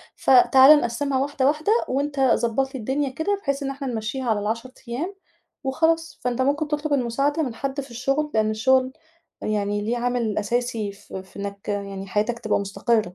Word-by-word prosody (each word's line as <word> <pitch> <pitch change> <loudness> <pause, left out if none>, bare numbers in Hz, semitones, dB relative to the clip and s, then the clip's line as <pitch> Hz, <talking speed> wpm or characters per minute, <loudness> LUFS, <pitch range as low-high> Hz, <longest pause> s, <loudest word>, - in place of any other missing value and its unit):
فتعالَ 265 +3 +7
نقسّمها 265 +3 -1
واحدة، 275 -1 0
واحدة 305 +8 +1 0.2
وأنت 280 +2 -1
ضبّط 265 0 +2
لي 260 - -4
الدنيا 270 +5 -1
كده، 390 +9 -1
بحيث 280 0 -1
إن 275 - -2
إحنا 275 0 -5
نمَشّيها 240 +2 -3
على 210 -2 +2
ال10 230 +5 -3 0.2
أيام 310 +12 -3 0.5
وخلاص، 325 +4 0
فأنت 250 +1 0
ممكن 290 +3 +1
تطلب 300 0 -1
المساعدة 275 +5 +1
من 240 -4 -4
حدّ 275 +2 -3
في 270 -2 -12
الشُغل، 275 +5 -1
لأن 215 -1 +2
الشُغل 260 +3 +2 0.5
يعني 205 -1 -1
ليه 230 +3 -1
عامل 240 -3 -1
أساسي 225 -1 -1
ف 200 - -17
في 190 +1 -8
إنّك 200 0 -6
يعني 200 -1 -4
حياتك 215 +4 -1
تبقى 215 -3 0
مستقرة. 215 +3 +1
255 Hz, 175 wpm, -24 LUFS, 220-280 Hz, 0.5 s, فتعالَ